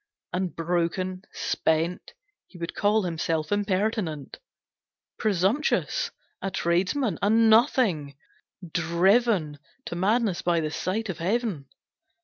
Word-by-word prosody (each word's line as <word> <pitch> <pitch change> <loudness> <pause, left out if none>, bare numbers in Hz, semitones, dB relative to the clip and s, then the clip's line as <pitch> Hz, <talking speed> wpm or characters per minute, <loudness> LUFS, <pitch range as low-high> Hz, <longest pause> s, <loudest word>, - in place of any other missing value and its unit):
And 180 -1 -2
broken, 175 +2 -1
spent, 165 +3 -1 0.3
He 180 - -15
would 170 0 -5
call 210 +1 +2
himself 165 -2 -2
impertinent; 200 - -1 0.8
Presumptuous; 210 - +1 0.3
a 195 - -2
tradesman; 185 - 0
a 200 - +2
nothing; 220 - +3 0.5
driven 170 0 +2 0.3
To - - -5
madness 205 +1 +1
by 170 -1 +2
the 155 -1 -2
sight 205 +6 -2
of 190 - -4
Heaven. 190 - -1
185 Hz, 105 wpm, -26 LUFS, 170-215 Hz, 0.8 s, nothing